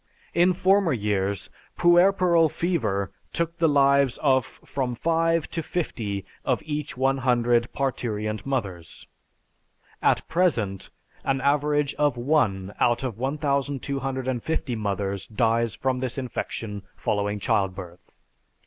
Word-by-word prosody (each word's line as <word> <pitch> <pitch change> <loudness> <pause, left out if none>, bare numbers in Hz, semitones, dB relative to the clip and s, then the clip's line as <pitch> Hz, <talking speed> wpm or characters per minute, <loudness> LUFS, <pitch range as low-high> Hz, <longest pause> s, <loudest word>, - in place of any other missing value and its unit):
In 175 +2 +4
former 190 -2 +3
years, 100 -3 -1 0.3
puerperal 175 -1 +5
fever 135 - -1 0.2
took 170 0 -2
the 165 -1 +4
lives 140 -2 +4
of 130 -3 +3
from 130 -3 -4
five 165 +2 +1
to 165 - -2
fifty 110 - -3 0.2
of - - 0
each 150 -3 -4
one 135 +1 +2
hundred 120 -2 +2
parturient 110 -6 -2
mothers. 100 -11 -4 1.0
At - - +2
present, 120 - 0 0.3
an 135 0 0
average 145 +1 +1
of 145 -4 +2
one 105 -8 +1
out 120 +1 +2
of 120 -5 -4
1250 135 -1 -1
mothers 100 -2 -2
dies 115 0 +1
of 130 -1 +1
this 130 0 -3
infection 115 -5 -4
following 105 0 -1
childbirth. 95 -3 -2
130 Hz, 115 wpm, -25 LUFS, 105-150 Hz, 1.0 s, puerperal